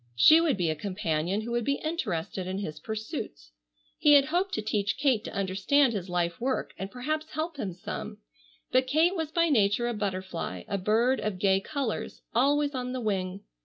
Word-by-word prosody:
She 310 - +7
would 310 -9 +2
be 170 -4 +1
a - - -2
companion 185 +1 -1
who 235 +2 -5
would 240 0 0
be 280 +4 +1
interested 190 - -2
in 190 +1 -3
his 175 -7 -5
pursuits. 135 - -6 0.5
He 295 - +6
had 280 -1 +7
hoped 355 +6 0
to 215 - -1
teach 210 -1 0
Kate 260 -6 +2
to - - -5
understand 200 +8 +2
his 190 -3 -4
life 175 +2 -1
work 260 +2 -1
and 190 - -4
perhaps 305 +7 -3
help 315 0 -3
him 205 -8 -3
some, 185 +4 -6 0.5
but 255 0 +3
Kate 320 +7 +3
was 320 -3 -3
by 335 0 +2
nature 220 -2 +3
a 240 - -1
butterfly, 185 - -4
a 200 - -2
bird 230 +7 +2
of 210 -3 -2
gay 190 0 +3
colors, 275 -3 -4
always 285 +4 +2
on 250 -1 -3
the 255 - -2
wing. 195 -3 -2
220 Hz, 195 wpm, -28 LUFS, 190-280 Hz, 0.5 s, She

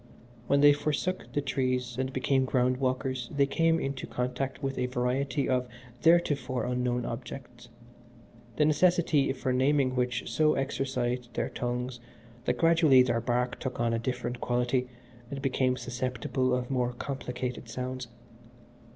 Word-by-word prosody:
When 140 0 +3
they 145 0 +8
forsook 150 +5 -2
the 145 - 0
trees 130 -2 -1
and 130 0 -1
became 130 0 +1
ground 130 -1 +1
walkers 130 -1 -1
they 140 -1 +3
came 165 +4 +2
into 135 -3 -3
contact 125 +3 -3
with 135 0 -2
a 125 - +1
variety 130 +3 0
of 125 -1 +1 0.3
theretofore 145 -6 +3
unknown 125 -1 -1
objects, 120 0 -7 0.9
the 150 - +3
necessity 155 -2 +3
for 130 -1 -2
naming 130 0 +2
which 125 -1 -1
so 155 -1 +2
exercised 125 -3 -2
their - - -1
tongues 125 0 -3 0.5
that 125 - +1
gradually 165 -6 +6
their 120 -2 0
bark 125 +1 -1
took 130 -3 -4
on 115 -1 +1
a 115 - 0
different 120 0 -3
quality 125 +1 0 0.4
and 140 - -5
became 130 -1 +1
susceptible 125 +1 -2
of 125 +1 -1
more 125 -2 0
complicated 125 -2 -5
sounds. 130 +1 -4
130 Hz, 140 wpm, -29 LUFS, 125-135 Hz, 0.9 s, they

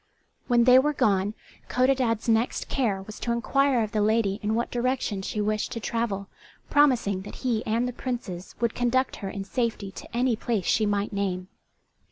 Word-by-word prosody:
When 240 -1 +4
they 250 +1 +8
were 300 +3 +1
gone 205 -1 +2 0.3
Codadad's 250 -3 +1
next 225 +1 +1
care 210 -8 0
was 215 +2 -10
to 235 - -2
inquire 255 +1 +2
of 215 - -4
the 215 - 0
lady 210 -1 +2
in 215 +1 0
what 235 - -1
direction 240 -5 -1
she 210 - -4
wished 210 0 -1
to 230 - -4
travel, 210 -4 -2 0.4
promising 245 -10 +3
that 195 - -9
he 230 -3 +1
and 230 +3 +1
the 250 - -4
Princes 230 -9 -5
would 235 -1 +1
conduct 255 +2 +1
her 195 - -5
in 195 0 -5
safety 215 -1 -2
to 235 - -8
any 250 -1 +2
place 215 -4 -2
she 215 -1 +2
might 205 0 -1
name. 190 -2 -2
225 Hz, 185 wpm, -26 LUFS, 205-245 Hz, 0.4 s, they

